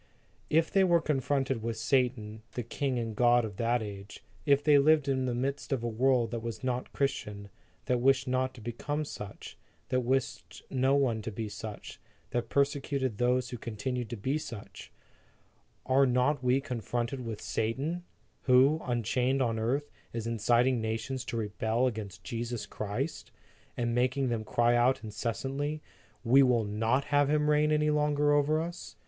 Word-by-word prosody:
If 160 Hz, +1 st, +2 dB
they 195 Hz, -, +4 dB
were 175 Hz, -2 st, +4 dB
confronted 135 Hz, -4 st, 0 dB
with 115 Hz, 0 st, -3 dB
Satan, 115 Hz, -3 st, 0 dB
the 120 Hz, -, -3 dB
king 130 Hz, +2 st, -2 dB
and 115 Hz, -2 st, -3 dB
god 120 Hz, 0 st, +4 dB
of 100 Hz, -3 st, -8 dB
that 120 Hz, 0 st, +1 dB
age; 100 Hz, -1 st, -9 dB, 0.2 s
if 140 Hz, 0 st, +4 dB
they 145 Hz, -1 st, +6 dB
lived 150 Hz, 0 st, +4 dB
in 130 Hz, -1 st, +1 dB
the 120 Hz, -, -1 dB
midst 140 Hz, +4 st, -3 dB
of 130 Hz, -4 st, 0 dB
a -, -, -1 dB
world 120 Hz, 0 st, +2 dB
that 115 Hz, -1 st, -3 dB
was 115 Hz, -2 st, -6 dB
not 125 Hz, -1 st, -2 dB
Christian, 105 Hz, -7 st, -2 dB, 0.4 s
that 125 Hz, -1 st, +1 dB
wished 135 Hz, 0 st, +3 dB
not 130 Hz, 0 st, 0 dB
to 120 Hz, -, -12 dB
become 145 Hz, +7 st, -3 dB
such, 105 Hz, -8 st, -9 dB, 0.3 s
that 130 Hz, -, +2 dB
wished 130 Hz, +1 st, -2 dB
no 130 Hz, +1 st, +2 dB
one 125 Hz, -6 st, +1 dB
to 110 Hz, +1 st, -5 dB
be 110 Hz, +1 st, -4 dB
such, 105 Hz, 0 st, -8 dB, 0.3 s
that 120 Hz, -1 st, -2 dB
persecuted 140 Hz, -4 st, 0 dB
those 125 Hz, 0 st, +1 dB
who 120 Hz, -, -5 dB
continued 120 Hz, +1 st, -4 dB
to 120 Hz, -, -5 dB
be 135 Hz, +9 st, -1 dB
such; 115 Hz, -8 st, -9 dB, 0.9 s
are 135 Hz, +1 st, +4 dB
not 125 Hz, +3 st, +1 dB
we 125 Hz, +2 st, +3 dB
confronted 120 Hz, 0 st, -3 dB
with 115 Hz, -3 st, -5 dB
Satan, 140 Hz, +11 st, -2 dB, 0.4 s
who, 135 Hz, +5 st, +5 dB
unchained 125 Hz, +2 st, 0 dB
on 115 Hz, -3 st, +1 dB
the -, -, -2 dB
earth, 140 Hz, +6 st, -1 dB, 0.2 s
is 115 Hz, -1 st, -3 dB
inciting 120 Hz, +2 st, +2 dB
nations 115 Hz, +4 st, -3 dB
to 120 Hz, -2 st, -4 dB
rebel 110 Hz, +3 st, 0 dB
against 105 Hz, -7 st, -4 dB
Jesus 120 Hz, 0 st, -4 dB
Christ, 110 Hz, +3 st, -4 dB, 0.5 s
and 120 Hz, -1 st, 0 dB
making 130 Hz, +2 st, +1 dB
them 115 Hz, -2 st, -2 dB
cry 120 Hz, +2 st, +2 dB
out 120 Hz, +2 st, +3 dB
incessantly: 135 Hz, +7 st, -3 dB, 0.2 s
" -, -, -33 dB
We 135 Hz, -, +9 dB
will 125 Hz, -4 st, +4 dB
not 115 Hz, +6 st, +1 dB
have 145 Hz, -1 st, +4 dB
Him 150 Hz, 0 st, +2 dB
reign 150 Hz, +1 st, +3 dB
any 150 Hz, 0 st, +2 dB
longer 150 Hz, 0 st, +2 dB
over 145 Hz, +2 st, +3 dB
us"? 170 Hz, +2 st, -6 dB
125 Hz, 170 wpm, -30 LUFS, 115-140 Hz, 0.9 s, We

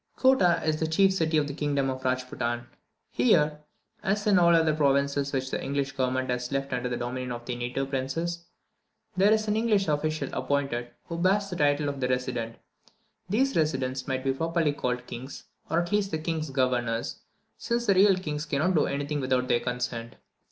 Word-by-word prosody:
Kottah 190 Hz, -11 st, +4 dB
is 155 Hz, -1 st, +1 dB
the 160 Hz, -, 0 dB
chief 190 Hz, +4 st, +4 dB
city 160 Hz, -3 st, +1 dB
of 150 Hz, -1 st, +2 dB
the 145 Hz, -, -4 dB
kingdom 140 Hz, -2 st, 0 dB
of 130 Hz, 0 st, -3 dB
Rajpootan. 125 Hz, -2 st, -2 dB, 0.5 s
Here, 150 Hz, +5 st, +3 dB, 0.4 s
as 210 Hz, +1 st, 0 dB
in 200 Hz, -3 st, +5 dB
all 170 Hz, -1 st, +5 dB
those 160 Hz, -2 st, +4 dB
provinces 140 Hz, -1 st, +1 dB
which 130 Hz, -1 st, -2 dB
the -, -, -2 dB
English 140 Hz, 0 st, -1 dB
government 130 Hz, 0 st, -1 dB
has 125 Hz, +1 st, -3 dB
left 135 Hz, 0 st, -2 dB
under 125 Hz, 0 st, -1 dB
the 120 Hz, -, -2 dB
dominion 125 Hz, +1 st, -4 dB
of 120 Hz, 0 st, -6 dB
their 125 Hz, -, -3 dB
native 125 Hz, +3 st, -3 dB
princes, 165 Hz, +6 st, -2 dB, 0.7 s
there 195 Hz, +3 st, +4 dB
is 215 Hz, 0 st, +2 dB
an 210 Hz, -, +1 dB
English 215 Hz, -3 st, +2 dB
official 155 Hz, +1 st, -1 dB
appointed, 135 Hz, -4 st, -1 dB, 0.2 s
who 170 Hz, 0 st, -5 dB
bears 200 Hz, +2 st, +2 dB
the -, -, -3 dB
title 145 Hz, -2 st, +2 dB
of 140 Hz, -1 st, -3 dB
the 125 Hz, -, 0 dB
"Resident." 120 Hz, -3 st, -2 dB, 0.7 s
These 265 Hz, +7 st, +1 dB
residents 130 Hz, -4 st, 0 dB
might 130 Hz, -1 st, -2 dB
be 135 Hz, 0 st, +1 dB
properly 165 Hz, +1 st, 0 dB
called 125 Hz, -3 st, -2 dB
"kings," 125 Hz, +3 st, -8 dB, 0.3 s
or 165 Hz, -, +2 dB
at 175 Hz, -, -5 dB
least 205 Hz, -1 st, +1 dB
the 160 Hz, -, -1 dB
king's 160 Hz, -1 st, -3 dB
governors, 125 Hz, -3 st, -1 dB, 0.4 s
since 235 Hz, 0 st, -1 dB
the 200 Hz, -, +4 dB
real 195 Hz, +1 st, +6 dB
kings 150 Hz, -4 st, -4 dB
cannot 155 Hz, +6 st, +1 dB
do 155 Hz, -, +3 dB
anything 145 Hz, +1 st, -2 dB
without 130 Hz, -1 st, +1 dB
their 120 Hz, -, +3 dB
consent. 120 Hz, -1 st, -4 dB
145 Hz, 190 wpm, -27 LUFS, 130-170 Hz, 0.7 s, real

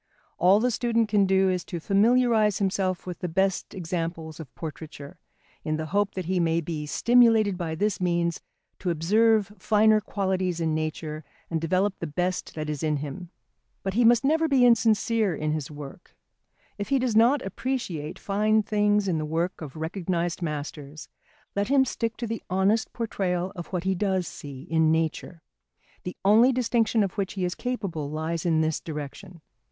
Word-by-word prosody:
All 185 Hz, +4 st, +5 dB
the 245 Hz, +2 st, +1 dB
student 230 Hz, -2 st, +1 dB
can 205 Hz, -2 st, +3 dB
do 190 Hz, 0 st, +3 dB
is 180 Hz, -2 st, 0 dB
to 175 Hz, -, -5 dB
familiarise 215 Hz, +2 st, +3 dB
himself 190 Hz, -2 st, -1 dB
with 180 Hz, -1 st, -6 dB
the 180 Hz, -, -3 dB
best 190 Hz, +4 st, 0 dB
examples 165 Hz, -3 st, -4 dB
of 155 Hz, -6 st, -9 dB
portraiture, 150 Hz, -2 st, -8 dB, 0.4 s
in 155 Hz, 0 st, -1 dB
the 155 Hz, -, -3 dB
hope 205 Hz, -1 st, +1 dB
that 185 Hz, -2 st, -3 dB
he 185 Hz, +1 st, 0 dB
may 165 Hz, -1 st, +2 dB
be 155 Hz, -2 st, -4 dB
stimulated 225 Hz, 0 st, +4 dB
by 170 Hz, -3 st, -3 dB
this 205 Hz, +3 st, -1 dB
means 170 Hz, -1 st, 0 dB, 0.4 s
to 180 Hz, -, -2 dB
observe 210 Hz, +5 st, +2 dB
finer 215 Hz, 0 st, +4 dB
qualities 190 Hz, -3 st, -1 dB
in 160 Hz, -1 st, 0 dB
nature 155 Hz, 0 st, -3 dB, 0.3 s
and 165 Hz, -1 st, -1 dB
develop 185 Hz, +4 st, 0 dB
the 165 Hz, -, -3 dB
best 180 Hz, +5 st, -2 dB
that 155 Hz, -1 st, -4 dB
is 150 Hz, -2 st, -3 dB
in 155 Hz, -2 st, 0 dB
him. 150 Hz, +5 st, -6 dB, 0.5 s
But 195 Hz, -1 st, -2 dB
he 240 Hz, +4 st, +3 dB
must 235 Hz, +2 st, +5 dB
never 320 Hz, +3 st, +2 dB
be 265 Hz, -4 st, +4 dB
insincere 225 Hz, -4 st, +3 dB
in 155 Hz, +1 st, -2 dB
his 155 Hz, -3 st, -3 dB
work. 145 Hz, +3 st, -11 dB, 0.6 s
If 205 Hz, -, -4 dB
he 275 Hz, -, +3 dB
does 250 Hz, -4 st, 0 dB
not 245 Hz, +5 st, +4 dB
appreciate 195 Hz, -, -4 dB
fine 215 Hz, +2 st, +1 dB
things 210 Hz, -1 st, +2 dB
in 170 Hz, -4 st, 0 dB
the -, -, -2 dB
work 165 Hz, +4 st, -2 dB
of 150 Hz, -2 st, -8 dB
recognised 170 Hz, +1 st, -2 dB
masters, 150 Hz, -1 st, -6 dB, 0.5 s
let 200 Hz, 0 st, 0 dB
him 270 Hz, 0 st, +4 dB
stick 230 Hz, -2 st, -3 dB
to 240 Hz, -, -3 dB
the 225 Hz, 0 st, -4 dB
honest 195 Hz, +4 st, +1 dB
portrayal 185 Hz, -5 st, -2 dB
of 175 Hz, -2 st, -7 dB
what 180 Hz, -2 st, -3 dB
he 190 Hz, 0 st, +1 dB
does 190 Hz, -1 st, 0 dB
see 140 Hz, -2 st, -9 dB
in 160 Hz, -1 st, +2 dB
nature. 160 Hz, +1 st, -2 dB, 0.6 s
The 180 Hz, -, -5 dB
only 225 Hz, +6 st, +6 dB
distinction 235 Hz, -3 st, +1 dB
of 195 Hz, +1 st, -4 dB
which 195 Hz, -1 st, -2 dB
he 190 Hz, -2 st, -2 dB
is 180 Hz, -, -2 dB
capable 195 Hz, -, -4 dB
lies 160 Hz, +2 st, -3 dB
in 160 Hz, -2 st, +3 dB
this 160 Hz, -1 st, 0 dB
direction. 160 Hz, +3 st, -8 dB
185 Hz, 180 wpm, -26 LUFS, 160-215 Hz, 0.6 s, only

